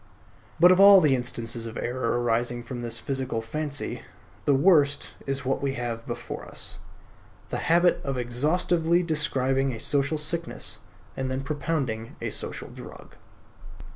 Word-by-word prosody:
But 175 +2 +8
of 185 - +4
all 200 0 +10
the 150 -6 +4
instances 120 -2 -1
of 115 - -7
error 120 -1 -1
arising 120 0 0
from 120 +1 -6
this 120 -1 -1
physical 130 -4 -2
fancy, 145 +5 -3 0.4
the 140 - +4
worst 145 -2 +3 0.2
is 135 0 -2
that 135 0 -1
we 140 -1 -1
have 115 -2 -4
before - - -6
us: - - -6 0.7
the - - -2
habit 175 +2 +4
of 135 -2 -2
exhaustively 160 +7 +1
describing 135 -4 +1
a 115 - -6
social 140 +5 0
sickness, 160 +2 -2 0.4
and 130 -1 -3
then 130 +1 -2
propounding 140 -6 -3
a - - -3
social - - -5
drug. - - -12
135 Hz, 145 wpm, -26 LUFS, 120-155 Hz, 0.7 s, all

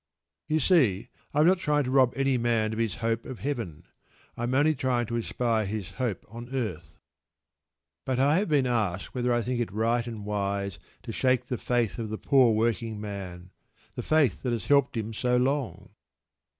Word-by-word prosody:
You 155 +1 +1
see, 125 - +3 0.2
I 150 - +2
am - - +5
not 185 +1 +4
trying 150 -3 +1
to 130 - -3
rob 130 -2 +4
any 135 -1 +1
man 115 -2 +1
of 110 - -4
his 115 -3 0
hope 115 0 0
of 130 - -7
Heaven; 115 - -4 0.5
I - - -7
am 125 +2 -1
only 150 +3 +4
trying 130 -3 0
to 115 - -4
inspire 115 -1 0
his 105 -2 -4
hope 120 -7 -3
on 115 +3 -9
earth. 85 -10 -4 1.1
But 130 -1 -1
I 145 +4 +4
have 205 - -1
been 145 -4 +3
asked 105 -7 -1
whether 125 -1 0
I 120 -1 +1
think 125 +1 -2
it 120 - -2
right 115 +3 0
and 110 -3 -6
wise 100 -2 -2 0.2
to - - -6
"shake 125 +1 +1
the 125 0 -3
faith 120 -2 0
of 110 -2 -3
the 110 - -4
poor 130 -2 +4
working 110 -1 0
man 95 -4 -7 0.4
the - - -4
faith 150 - +2
that 125 -2 -1
has 115 -5 -3
helped 140 -3 +3
him 110 0 -3
so 125 +3 +1
long." 135 0 -1
120 Hz, 195 wpm, -27 LUFS, 110-130 Hz, 1.1 s, am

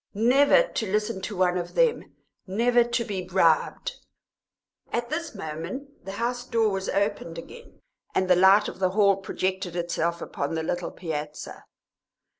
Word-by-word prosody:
"Never 270 - +5
to 220 - -4
listen 210 -1 -1
to 200 0 -5
one 180 -1 +2
of 175 - -6
them, - - +1 0.3
never 240 +5 +3
to 235 0 -1
be 195 -3 -3
bribed 180 - +1 0.5
" - - -66
At 240 +1 -2
this 320 -4 -3
moment 190 - -7
the 195 - -6
house 245 +3 -2
door 230 -3 +1
was 195 -1 -3
opened 200 -5 -1
again, 470 - -12 0.3
and 185 - +2
the 180 - +5
light 190 +3 +6
of - - -7
the 185 -1 +2
hall 200 -2 +5
projected 190 -1 -3
itself 170 -1 -1
across 145 -1 -3
the 160 - -2
little 175 +2 -2
piazza. 155 -3 -6
195 Hz, 160 wpm, -26 LUFS, 180-235 Hz, 0.5 s, light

